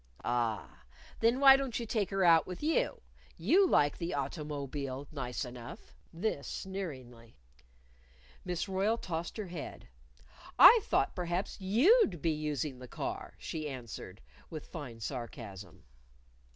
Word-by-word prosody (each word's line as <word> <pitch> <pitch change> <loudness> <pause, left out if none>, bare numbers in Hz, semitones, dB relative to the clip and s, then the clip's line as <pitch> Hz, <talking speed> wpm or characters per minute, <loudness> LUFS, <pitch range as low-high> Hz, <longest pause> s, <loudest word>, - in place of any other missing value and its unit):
"A - - -6
a - - +1
ah! 115 - -2 0.4
Then 230 +3 +3
why 270 -1 +9
don't 270 -4 -2
you 235 - -4
take 210 -3 -1
her 195 -1 0
out 165 -1 +6
with 185 +9 -7
you? 315 +1 +1 0.4
You 340 - +4
like 145 0 +3
the 170 -1 -2
auto_mo_bile 140 -2 -4
nice 130 -2 -3
enough," 120 -1 -10 0.2
this 165 -5 -2
sneeringly. 130 - -7 1.1
Miss 180 0 -2
Royle 195 +4 +1
tossed 170 -3 -4
her 215 - -3
head. 170 -4 -8 0.7
"I 465 +3 +10
thought - - +1
perhaps 180 +3 -3
you'd 230 - +4
be 165 +2 +1
using 150 -3 -3
the 125 - -9
car," - - -5
she 155 -2 -5
answered, 115 -6 -8 0.3
with 155 -2 -7
fine 135 -9 -8
sarcasm. 110 - -7
160 Hz, 140 wpm, -32 LUFS, 130-195 Hz, 1.1 s, I